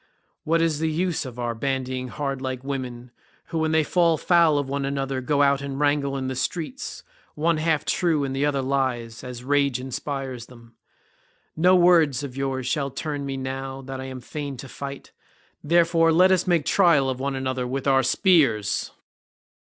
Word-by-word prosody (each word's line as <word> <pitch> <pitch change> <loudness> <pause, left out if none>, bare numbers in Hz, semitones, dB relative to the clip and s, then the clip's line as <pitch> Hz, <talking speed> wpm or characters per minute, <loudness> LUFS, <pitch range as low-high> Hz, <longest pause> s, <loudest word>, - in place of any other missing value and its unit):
What 165 +1 +2
is 160 -3 0
the 160 0 0
use 170 0 -1
of 125 -2 -10
our 120 -1 -2
bandying 130 +1 -2
hard 135 0 -4
like 130 -1 -4
women 125 -3 -5 0.4
who 165 - -2
when 160 0 +1
they 160 0 +3
fall 170 0 +2
foul 170 -4 +4
of 145 -1 -1
one 140 +1 -2
another 135 -1 -2
go 145 +2 +2
out 140 -1 +3
and 140 -1 -5
wrangle 145 -1 +1
in 130 -1 -3
the 130 - -2
streets, 175 - -4 0.3
one 165 +2 +1
half 155 -1 0
true 165 -5 +1
and 135 -1 -3
the 135 - 0
other 140 -2 +1
lies, 130 -4 -2
as 125 -1 -7
rage 140 -1 +1
inspires 130 -1 -5
them? 115 -2 -16 0.8
No 180 +4 +5
words 165 -7 +4
of 135 -3 -6
yours 135 -1 -2
shall 140 +1 -1
turn 145 +1 -4
me 135 -1 -3
now 135 0 -5
that 135 0 -6
I - - -6
am 130 -1 -7
fain 145 -1 -6
to 135 - -8
fight—therefore 165 +4 -1
let 180 +3 +5
us 185 0 +2
make 170 -4 +2
trial 170 -8 +4
of 130 -1 -2
one 140 +1 -2
another 130 -1 -2
with 135 +1 -3
our 135 -1 +4
spears." 130 - +2
140 Hz, 180 wpm, -24 LUFS, 130-155 Hz, 0.8 s, No